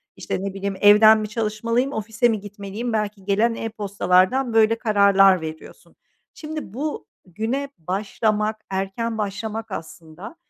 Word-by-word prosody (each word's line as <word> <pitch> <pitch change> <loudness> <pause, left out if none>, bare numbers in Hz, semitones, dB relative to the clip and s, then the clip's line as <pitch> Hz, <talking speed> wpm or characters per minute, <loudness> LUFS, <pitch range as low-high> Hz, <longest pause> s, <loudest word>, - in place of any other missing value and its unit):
işte, 190 - -4
ne 200 - -4
bileyim, 195 0 -4
evden 215 +1 +7
mi 215 -1 -4
çalışmalıyım, 230 +4 -1
ofise 225 +3 0
mi 220 -2 0
gitmeliyim?" 205 +3 -6
Belki 210 -2 -2
gelen 215 +4 +1
e-postalardan 205 +2 +1
böyle 225 0 +4
kararlar 200 -4 +4
veriyorsun. 160 0 -10 0.4
Şimdi 305 - -7
bu 295 +5 -4 0.2
güne 225 +10 -3
başlamak, 210 +4 -1
erken 195 +4 -3
başlamak 215 +1 -4
aslında, 165 - -9
210 Hz, 125 wpm, -22 LUFS, 195-225 Hz, 0.4 s, evden